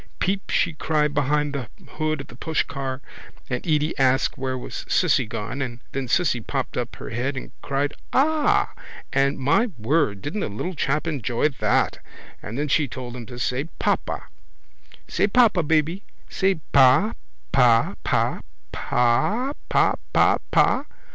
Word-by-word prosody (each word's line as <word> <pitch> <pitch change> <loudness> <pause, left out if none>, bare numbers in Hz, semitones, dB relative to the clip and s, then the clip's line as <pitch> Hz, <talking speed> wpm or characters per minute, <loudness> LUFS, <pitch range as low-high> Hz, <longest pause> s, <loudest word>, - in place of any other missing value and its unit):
Peep 195 +1 -1
she 175 - +2
cried 150 -1 0
behind 145 0 +1
the 130 -7 -4 0.3
hood 155 -1 0
of - - -9
the - - -13
pushcar 140 -2 -2 0.5
and 125 - -2
Edy 155 0 +1
asked 135 0 +3
where 130 0 -3
was 125 - -6
Cissy 125 - +3
gone 110 +6 -4
and 120 -2 -4
then 135 -1 -3
Cissy 125 -2 +2
popped 135 +3 -3
up 120 -1 -3
her - - -8
head 130 +4 -2
and - - -7
cried 140 +1 -1 0.2
ah! 315 +9 +2 0.4
and, 140 +1 +2
my 145 - +3
word, 110 -4 +1
didn't 155 +9 -3
the - - -2
little 140 - -4
chap 150 0 0
enjoy 140 -3 0
that! 135 - +1 0.4
And 110 +4 -6
then 150 +1 -1
she 150 +1 +2
told 125 -1 -7
him 120 -3 -8
to 120 - -9
say 125 +3 -1
papa. - - -1 0.8
—Say - - +1
papa, 215 -4 +4
baby. 160 +4 +1 0.3
Say 190 0 +1 0.2
pa 135 - +5 0.4
pa 120 -4 +4
pa - - +1 0.3
pa 200 - +1 0.2
pa - - +4 0.2
pa - - +5 0.2
pa. - - +3
140 Hz, 155 wpm, -24 LUFS, 125-160 Hz, 0.8 s, pa